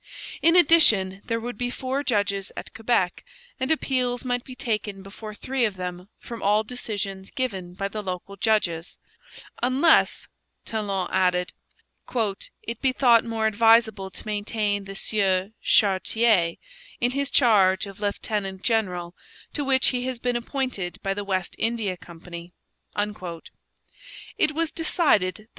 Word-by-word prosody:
In 330 +1 +5
addition, 225 - +5
there 230 0 -1
would 240 -1 -6
be 245 0 -1
four 260 +3 -2
judges 200 -5 0
at - - -7
Quebec, 225 -6 0 0.4
and 260 +1 -1
appeals 255 -5 0
might 245 -1 -1
be 255 - -10
taken 210 -6 -3
before 210 +2 -9
three 265 +3 -2
of 210 -4 +1
them 180 +1 -6
from 235 -1 -8
all 210 +2 +3
decisions 205 -5 -4
given 190 -10 -4
by 195 +1 -2
the 210 +2 -5
local 190 0 -5
judges 190 -5 0 0.6
'unless,' 265 +7 +3 0.4
Talon 200 -4 -2
added, 180 -1 +1 1.1
'it 230 0 -6
be 265 - +3
thought 245 -3 +5
more 225 -1 -2
advisable 220 -2 +4
to 190 - -8
maintain 205 -1 -1
the 195 0 -8
Sieur 195 -1 +1
Chartier 195 -2 +3 0.4
in 245 +1 +2
his 280 +1 -1
charge 200 -8 +4
of 195 0 -10
lieutenant 200 -2 -2
general, 180 -7 0 0.4
to 290 - -2
which 265 -1 +3
he 250 0 -2
has 260 -1 -3
been 245 +1 -1
appointed 240 -7 -3
by 195 - 0
the 205 +1 -4
West 185 -3 -2
India 225 -5 0
Company.' 170 0 -11 1.9
It 305 - +3
was 330 0 0
decided 295 - +2
that - - -13
M. 215 - -21
215 Hz, 145 wpm, -25 LUFS, 190-245 Hz, 1.9 s, In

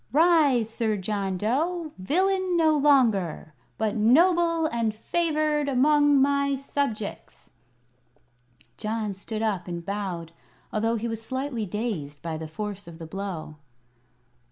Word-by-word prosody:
"Rise, 295 -7 +4
Sir 220 -1 -1
John 195 -1 -2
Dough 310 - -1
villain 370 - +1
no 315 -2 +4
longer, 230 - +2 0.2
but 220 0 -1
noble 335 - +4
and 230 -7 -1
favored 305 +2 0
among 290 +2 +4
my 280 0 +2
subjects!" 270 -6 -4 1.3
John 215 -1 -2
stood 215 +3 -5
up 195 -5 -1
and 170 -1 -5
bowed, 185 -5 -4 0.4
although 225 +2 +1
he 230 +1 -2
was 225 -1 -4
slightly 260 -2 -3
dazed 175 - -4
by 165 -1 -3
the 160 0 -6
force 205 +3 -6
of 165 -1 -10
the 165 - -8
blow. 170 -3 -6
225 Hz, 125 wpm, -26 LUFS, 200-290 Hz, 1.3 s, Rise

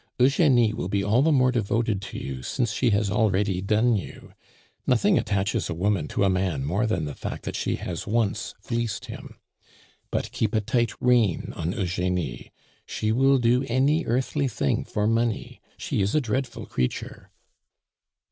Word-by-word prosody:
Eugenie 125 -4 +4
will 90 - -3
be 100 +1 0
all 110 +5 +3
the 160 +3 +3
more 130 -3 +4
devoted 115 -3 0
to 100 - -7
you 65 -1 -5
since 120 - -1
she 125 - +2
has 100 -2 +1
already 100 -3 +1
done 110 +4 +2
you. 100 - -7 0.5
Nothing 150 - +3
attaches 100 -3 -1
a 85 - -2
woman 95 -3 0
to - - -1
a - - +4
man 90 -7 0
more 100 +10 0
than 90 -8 -1
the 75 - -5
fact - - -6
that - - -4
she - - -1
has 85 -2 -5
once 110 -1 -1
fleeced 115 -3 -3
him. - - -10 0.7
But - - -2
keep 110 0 -1
a 110 - +3
tight 120 +2 0
rein 120 -8 +2
on 85 +3 -2
Eugenie; 90 - -2 0.4
she 110 - -1
will 135 +4 +4
do 125 +1 +2
any 140 +7 +2
earthly 135 +4 0
thing 125 - -1
for 105 - -1
money; 115 0 -1 0.2
she - - -2
is 100 +6 0
a - - +5
dreadful 130 -1 -3
creature!" 65 -1 -3
110 Hz, 170 wpm, -25 LUFS, 95-125 Hz, 0.7 s, a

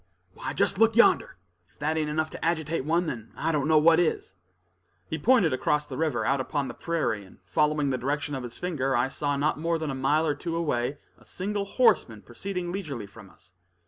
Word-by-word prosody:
"Why, - - -5
just 195 - 0
look 225 -1 +4
yonder, 235 - +4 0.3
if 95 - -32
that 155 +2 -1
ain't 155 -1 0
enough 155 +1 -1
to - - -8
agitate 160 -3 -1
one, 170 +3 +2
then 115 -7 -6
I 165 - 0
don't 150 -2 0
know 155 -1 +5
what 160 +2 +6
is." 160 - 0 0.7
He 160 - -4
pointed 205 - +4
across 150 +3 +1
the - - -7
river, 145 -9 0
out 135 +1 +2
upon 140 +1 -2
the - - -6
prairie; 160 -11 -2
and 95 - -17
following 150 +8 +1
the 130 - -1
direction 145 +3 -2
of 135 - -3
his 120 -1 -7
finger, 135 -7 -1
I 120 +2 +2
saw 145 +1 -1
not 150 +1 0
more 165 +1 0
than 155 -3 -3
a - - -3
mile 140 +4 +1
or 150 - +1
two 165 +2 -4
away 145 -5 -1 0.2
a - - -20
single 200 +2 -3
horseman 125 - +2
proceeding 180 +7 -5
leisurely 155 - -5
from 100 0 -14
us. 90 - -20
150 Hz, 215 wpm, -27 LUFS, 130-165 Hz, 0.7 s, what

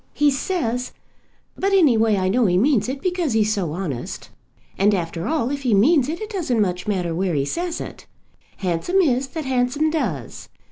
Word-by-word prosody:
He 295 -1 +4
says; 250 -4 -2 0.6
but 390 +1 0
any 320 -11 +5
way 220 -2 +3
I 185 -1 0
know 225 +4 +3
he 180 -1 +2
means 245 +1 +2
it 270 +1 -5
because 355 -7 0
he's 215 -1 +2
so 185 -7 -2
honest. 155 -8 -5 0.4
And 205 +1 +3
after 170 -1 -3
all 295 -5 0
if 285 -1 -3
he 245 -6 +2
means 270 - +4
it, 330 +3 -3
it 435 +1 -6
doesn't 315 - -1
much 180 -3 -1
matter 180 -5 -1
where 180 0 -1
he 140 -1 +1
says 345 - -3
it. - - -9 0.5
Handsome 185 - -1
is 265 -5 +1
that 310 +2 -6
handsome 265 +4 +1
does. 190 - -3
245 Hz, 190 wpm, -22 LUFS, 190-305 Hz, 0.6 s, any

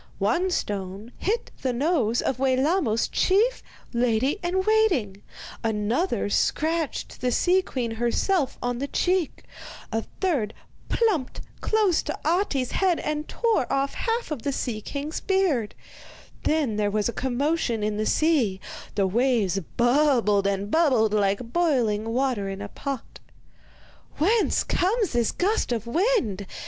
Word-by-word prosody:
One 235 - +1
stone 200 - -3
hit 440 +5 -1
the 260 - 0
nose 245 -4 +1
of 260 - -1
Wellamos's 265 - +2
chief 440 +7 +2 0.3
lady 245 - +1
in 360 +2 0
waiting, 360 - +2 0.4
another 225 - 0
scratched 315 +8 -1
the 250 - +1
sea 365 +9 +3
queen 250 -9 -3
herself 255 - 0
on 245 0 -1
the 280 - -2
cheek, 360 +1 0 0.5
a 225 0 0 0.2
third 280 - 0 0.3
plumped 395 - 0 0.2
close 425 -6 +2
to 300 - -4
Ahti's 315 -7 +1
head 370 -3 +2
and 300 0 -3
tore 455 - 0
off 275 0 0
half 460 -5 -2
of 290 -6 -3
the 280 - -1
sea 240 -5 -3
king's 285 +7 -4
beard; 355 - 0 0.7
then 295 -9 +1
there 205 -1 +1
was 210 0 0
a 235 - -3
commotion 265 -2 -1
in 210 0 -1
the 215 0 -1
sea, 275 - +2 0.4
the 200 -1 +2
waves 215 -2 +1 0.2
bubbled 240 -6 +3
and 200 +1 -2
bubbled 255 -10 +3
like 205 +3 0
boiling 235 -11 +1
water 240 -5 0
in 195 0 -5
a 205 0 -6
pot. 275 0 -6 1.0
'Whence 420 +8 +2
comes 405 +3 +1
this 240 -2 +2
gust 405 - 0
of 230 -2 -1
wind? 235 - 0
260 Hz, 135 wpm, -25 LUFS, 220-345 Hz, 1.0 s, sea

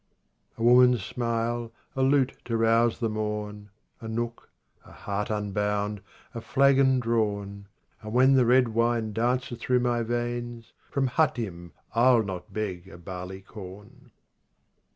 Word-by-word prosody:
9 115 - +1
A - - +7
woman's 125 -3 +5
smile, 115 -1 -2 0.2
a 135 - -1
lute 135 -1 +3
to 115 -1 -1
rouse 115 +1 +3
the 115 - -1
morn, 105 -1 -4 0.3
A 115 - -8
nook, 115 +1 -4 0.3
a - - -17
heart 100 0 -4
unbound, 105 -1 -1 0.3
a 115 - -5
flagon 135 0 +3
drawn. 100 -4 -2 0.3
And 110 -1 -7
when 130 +3 +5
the 130 -3 +4
red 125 0 +4
wine 115 -1 0
dances 120 +2 -1
through 125 +1 +1
my 120 -1 +1
veins 120 0 -4 0.2
From 140 -1 0
Hatim 115 - -1
^ - - -25 0.2
I'll 120 0 +5
not 95 -3 -7
beg 95 -4 -4
a 95 - -12
barley 90 +2 -7
corn. 105 +6 -12
115 Hz, 145 wpm, -27 LUFS, 105-120 Hz, 0.3 s, A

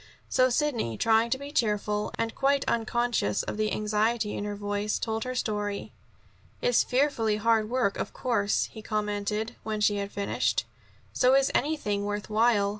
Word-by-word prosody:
So 255 0 +4
Sidney, 240 - 0
trying 225 +1 +3
to 260 - +1
be 280 +1 -8
cheerful, 210 -4 0
and 230 0 -1
quite 275 0 +1
unconscious 235 - 0
of - - -5
the 215 0 0
anxiety 215 +1 0
in 205 - -3
her 205 0 -3
voice, 205 +1 -2
told 220 0 -2
her 255 0 -3
story. 210 -4 -2 0.7
"It's - - +3
fearfully 250 -5 +1
hard 220 0 +2
work, 240 -5 0
of - - -3
course," 205 -5 0
he 220 - -9
commented, 210 0 -2
when 215 -1 -3
she 205 0 +3
had 200 0 -3
finished. 200 0 0 0.5
"So 255 +1 +4
is 275 0 +3
anything 220 -10 0
worth 205 +1 -4
while. 215 -2 +3
220 Hz, 165 wpm, -28 LUFS, 205-240 Hz, 0.7 s, So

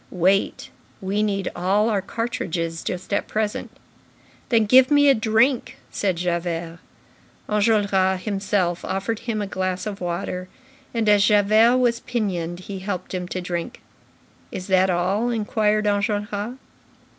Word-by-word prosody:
"Wait. 190 +2 +1 0.3
We 195 +2 -1
need 195 -3 -1
all 200 +4 +2
our 210 -4 +1
cartridges 185 -7 -3
just 180 +2 -4
at - - 0
present." 215 -1 -2 0.8
"Then 225 -3 +3
give 255 +4 +6
me 290 -1 +5
a - - +7
drink," 225 +3 +1
said 190 -3 0
Javert. 170 -1 -3 0.7
Enjolras 200 -3 +2
himself 195 -4 -1
offered 200 +3 -2
him 225 -3 -3
a - - -2
glass 185 -1 -3
of 205 -2 -5
water, 180 +1 -4 0.4
and, 230 -2 -1
as 205 -1 +5
Javert 215 +4 +5
was 240 -2 +2
pinioned, 185 -9 -3
he 195 +1 -7
helped 185 -1 -5
him 180 -1 -3
to 185 - -4
drink. 175 -1 -5 0.7
"Is 185 - -6
that 190 0 +3
all?" 190 +6 +1
inquired 215 -2 0
Enjolras. 205 +3 -1
200 Hz, 135 wpm, -23 LUFS, 185-220 Hz, 0.8 s, a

